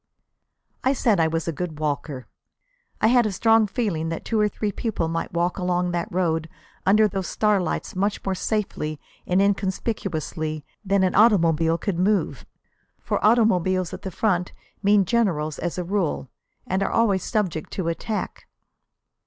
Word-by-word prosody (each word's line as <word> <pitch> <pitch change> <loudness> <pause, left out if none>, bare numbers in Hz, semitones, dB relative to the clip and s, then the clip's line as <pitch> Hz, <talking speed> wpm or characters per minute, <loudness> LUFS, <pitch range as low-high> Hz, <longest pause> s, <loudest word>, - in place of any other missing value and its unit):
I 265 - +3
said 225 -7 +2
I 160 - +4
was 165 +1 -2
a - - +1
good 165 -1 -5
walker. 145 -3 -3 0.8
I - - +3
had 240 0 +5
a - - -2
strong 225 +2 +4
feeling 190 -8 -2
that 165 - -5
two 225 - 0
or 210 0 +3
three 210 0 -2
people 200 -5 -2
might 165 0 -3
walk 175 +2 0
along 180 0 0
that 170 -1 -2
road 165 -3 0 0.4
under 215 +2 +6
those 190 -2 -3
starlights 210 -4 0
much 200 +2 -1
more 195 - 0
safely 185 -7 -2 0.3
and 180 +1 +2
inconspicuously 190 -6 -1 0.2
than 195 -1 +2
an 185 - +2
automobile 165 -7 +4
could 180 -2 -2
move. 200 +2 0 0.5
For - - -2
automobiles 185 -5 +3
at - - -7
the 190 - -4
front 180 -2 0 0.3
mean 200 -1 +4
generals 170 -10 0
as 175 0 -3
a 180 - -1
rule, 175 -8 -2 0.3
and 190 +1 -1
are - - +1
always 200 -5 +2
subject 185 -8 -1
to 185 -4 -2
attack. 205 +6 -4
185 Hz, 160 wpm, -24 LUFS, 165-210 Hz, 0.8 s, under